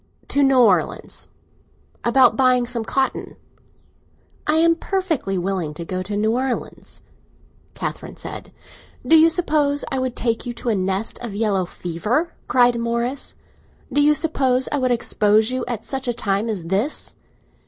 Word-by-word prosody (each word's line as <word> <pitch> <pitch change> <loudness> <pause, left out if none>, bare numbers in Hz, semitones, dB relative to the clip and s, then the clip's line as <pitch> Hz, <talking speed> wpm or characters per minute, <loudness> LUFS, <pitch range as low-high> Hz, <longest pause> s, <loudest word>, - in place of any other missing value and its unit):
"To 285 - +2
New 270 -1 +4
Orleans. 215 -7 +1 0.7
About 240 -1 +5
buying 255 -1 +3
some 240 -2 -2
cotton." 265 +6 -2 1.1
"I 305 - +3
am 330 +1 +4
perfectly 330 - -2
willing 180 -4 -2
to 170 - -6
go 185 +2 -3
to 205 +2 -4
New 215 +1 +1
Orleans." 255 +1 -3 0.7
Catherine - - -5
said. - - -8 0.5
"Do 325 - +5
you 320 +1 +7
suppose 300 -4 +1
I 265 - 0
would 255 -1 -2
take 230 -2 -1
you 245 - -5
to 235 - -4
a 220 - +2
nest 190 +2 -1
of 235 -5 -6
yellow 200 -4 +1
fever?" 210 - -2
cried 245 -1 +4
Morris. 235 +3 -2 0.6
"Do 290 - +3
you 300 +1 +5
suppose 265 -5 +1
I 290 - 0
would 255 -1 +1
expose 220 -2 +2
you 255 -1 -2
at 235 -3 -4
such 270 -1 -3
a 240 - +1
time 205 -1 -1
as 195 -6 -3
this?" 200 - -1
240 Hz, 155 wpm, -21 LUFS, 210-270 Hz, 1.1 s, you